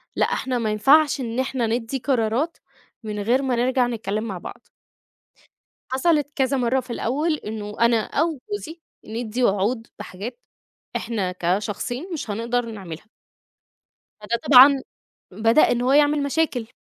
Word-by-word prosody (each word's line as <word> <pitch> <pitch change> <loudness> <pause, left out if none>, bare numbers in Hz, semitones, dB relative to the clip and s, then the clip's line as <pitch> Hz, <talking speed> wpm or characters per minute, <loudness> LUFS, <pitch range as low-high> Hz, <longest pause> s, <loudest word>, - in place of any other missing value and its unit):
لأ، - - +3
إحنا 255 -1 -1
ما 215 -2 -1
ينفعش 280 +6 +4
إن 230 0 -3
إحنا 260 -2 -1
ندّي 235 +3 -2
قرارات، 255 +4 0 0.5
من 210 -1 -4
غير 240 +6 +2
ما 260 -3 0
نرجع 250 +1 +2
نتكلّم 215 -2 -3
مع 195 -5 -4
بعض. - - -10 1.2
حصَلِت 295 +2 +2
كذا 270 0 +1
مرّه 250 +1 +1
في 255 - -10
الأول 295 +9 0
إنه 210 -4 -7
أنا 235 -1 +4
أو 315 -1 -1
جوزي، 335 -5 -6 0.2
ندّي 230 +2 -3
وعود 225 +3 +1
بحاجات، 205 - -7 0.6
إحنا 200 -6 -2
كشخصين 210 - -2
مش 300 -8 -5
هنقدر 235 +3 -1
نعمِلها. 195 -5 -8 1.1
فده 230 +3 -1
طبعًا، 270 0 +8 0.5
بدأ 225 +8 +3
إن 240 - 0
هو 255 - +1
يعمل 290 0 +4
مشاكل. 280 -5 -1
240 Hz, 140 wpm, -23 LUFS, 220-270 Hz, 1.2 s, طبعًا